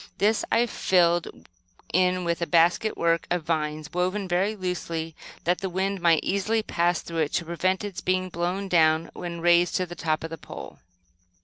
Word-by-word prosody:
This 215 +2 +2
I 230 +1 +4
filled 175 -6 +2 0.7
in 180 +1 +2
with 170 0 -1
a 170 - 0
basket 175 +6 +3
work 170 0 +1
of 175 -2 0
vines, 155 -1 -2
woven 185 +3 -1
very 190 +4 +1
loosely 170 -4 -4 0.3
that 175 +2 +1
the 190 - -3
wind 190 +1 -2
might 170 -2 +4
easily 215 +3 0
pass 175 -3 0
through 165 -1 -4
it, 150 -2 0
to 170 - 0
prevent 185 +3 0
its 205 -3 -5
being 185 0 0
blown 180 +3 -2
down 160 -2 +3
when 170 -1 -6
raised 175 0 +4
to 185 - +1
the 175 - -9
top 155 -2 -1
of 160 - -5
the 165 - -7
pole. - - -10
175 Hz, 185 wpm, -26 LUFS, 165-185 Hz, 0.7 s, I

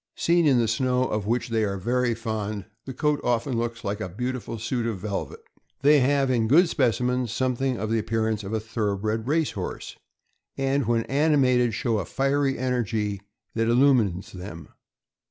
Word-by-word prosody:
Seen 170 -1 +3
in 135 -3 +4
the 115 -1 +2
snow, 125 +3 +1
of 105 -1 -2
which 120 +2 0
they 115 -1 +1
are 100 -2 -1
very 120 +4 0
fond, 110 -3 -4 0.2
the 130 - -6
coat 150 -1 +1
often 120 +1 0
looks 115 -1 -3
like 100 +2 -3
a 95 - -3
beautiful 125 +3 -4
suit 115 +2 -2
of 110 -4 -2
velvet. 100 +1 -5 0.4
They 145 +1 +6
have, 135 0 +2
in 115 -3 +1
good 170 +9 +6
specimens, 125 -2 +1
something 130 +1 0
of 110 0 -3
the 115 - +2
appear 110 0 -1
ance 110 -1 -2
of 95 - -6
a 110 - 0
thorough 110 -2 -2
bred 110 +3 -2
race 155 +1 +1
horse, - - -6 0.6
and 135 -2 0
when 115 -1 +2
animated 130 -5 +2
show 115 -3 0
a 95 - -3
fiery 135 +2 0
energy 115 -5 -1 0.3
that 115 0 0
illumines 115 -6 +3
them. 90 -5 -9
115 Hz, 180 wpm, -25 LUFS, 110-130 Hz, 0.6 s, They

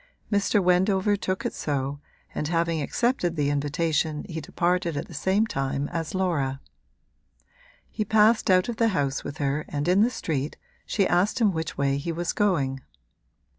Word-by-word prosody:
Mr. 200 0 +2
Wendover 190 +3 +3
took 185 -1 -3
it - - -1
so, 140 -1 -2 0.3
and 150 - -2
having 165 -1 0
accepted 180 - 0
the 145 -2 +1
invitation 150 +1 0
he 160 -4 -5
departed 175 +1 0
at - - -4
the - - -12
same 190 +8 +1
time 135 -5 -2
as 165 +1 -4
Laura. 145 -8 0 1.3
He 215 - -3
passed 215 +1 +4
out 185 -1 +4
of 235 -2 -4
the 230 - +3
house 140 -1 -1
with 145 - -6
her 145 0 -1
and 145 +1 -2
in 185 +3 +4
the 230 - +4
street 150 - -3 0.3
she 200 - +1
asked 185 +8 +2
him 215 -4 +4
which 160 -1 -4
way 140 0 +1
he 155 +4 -3
was 170 +1 -2
going. 145 -11 +1
170 Hz, 170 wpm, -26 LUFS, 145-190 Hz, 1.3 s, passed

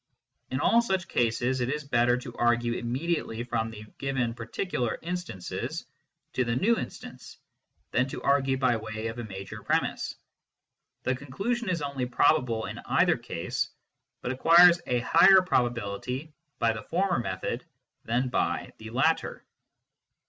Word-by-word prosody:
In 130 - -2
all 230 - +4
such 190 -6 -1
cases, 120 +2 +1
it 120 - 0
is 150 +2 -2
better 120 -2 +2
to 125 -1 -8
argue 120 0 +2
immediately 120 0 -2
from 115 -2 -1
the 110 -1 -9
given 130 -4 -1
particular 120 - -3
instances 175 - -4 0.5
to 130 - +1
the 120 -1 -1
new 215 - +3
instance, - - -8 0.5
than 125 +2 +2
to - - -6
argue 135 -1 +2
by 130 -3 +2
way 110 0 -6
of 115 +2 -7
a - - -3
major 95 -3 -8
premiss; - - -1 0.9
the 130 - +1
conclusion 195 - -3
is 170 -5 -1
only 140 -3 -2
probable 125 -3 +2
in - - -6
either - - +3
case, - - -3 0.5
but 125 - -2
acquires 170 +6 +7
a 125 -1 +1
higher 190 +9 +7
probability 125 - -1 0.2
by 115 -1 +2
the 110 - -6
former 185 +1 0
method 95 -5 -3 0.4
than 120 +3 0
by - - -1
the 110 0 -8
latter. 135 +8 0
125 Hz, 145 wpm, -28 LUFS, 115-155 Hz, 0.9 s, acquires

